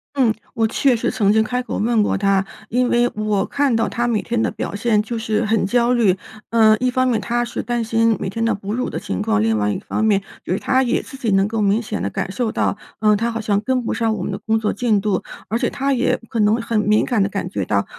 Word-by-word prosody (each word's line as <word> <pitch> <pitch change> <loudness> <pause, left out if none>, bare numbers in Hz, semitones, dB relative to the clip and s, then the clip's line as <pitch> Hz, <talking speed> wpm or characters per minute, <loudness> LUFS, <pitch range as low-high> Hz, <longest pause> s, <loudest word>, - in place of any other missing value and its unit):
嗯， 250 -5 +3 0.2
我 225 - +2
确 255 +3 +2
实 225 - -1
曾 200 -2 +2
经 220 +1 +4
开 250 +3 -2
口 250 - -4
问 225 +1 +2
过 205 - +1
她， 195 -1 +2 0.3
因 245 +1 +1
为 240 0 +3
我 210 -2 0
看 280 -4 +1
到 225 - +1
她 240 0 -1
每 225 -3 +1
天 235 -1 -1
的 - - +1
表 - - -5
现 215 +1 +1
就 230 +2 -4
是 220 0 0
很 215 -1 +1
焦 240 +4 +2
虑。 210 -7 +3 0.3
呃， 220 -1 +5
一 255 - +1
方 255 +1 +1
面 230 -4 +1
她 240 +4 -1
是 - - -4
担 240 0 -2
心 225 -1 +2
每 - - -3
天 225 +4 -3
的 230 -1 +1
哺 200 +1 -5
乳 250 +2 -1
的 - - -4
情 95 - -4
况， 105 -1 +1
另 110 0 +2
外 105 0 +1
一 - - -2
方 215 - -3
面 205 -3 +3 0.2
就 - - -5
是 - - 0
她 260 - +2
也 250 - 0
自 270 - -11
己 245 -4 -2
能 195 0 +3
够 220 0 -2
明 205 +2 +2
显 205 - -4
地 100 - -1
感 185 - -3
受 230 +1 -1
到， - - 0 0.2
呃， 210 0 +4
她 230 +3 0
好 230 - -3
像 205 -2 0
跟 255 +2 0
不 - - -2
上 225 -1 0
我 190 - -4
们 200 - -3
的 195 - -4
工 220 +1 0
作 215 -1 -1
进 220 -2 +1
度。 200 -2 -1 0.3
而 225 - 0
且 - - +1
她 275 0 -1
也 250 -1 +1
可 230 - -3
能 210 +1 +4
很 230 -1 0
敏 210 0 +2
感 230 -4 +1
地 195 - +1
感 195 0 -3
觉 100 - -2
到， 100 +2 0
220 Hz, 295 characters per minute, -20 LUFS, 205-240 Hz, 0.3 s, 呃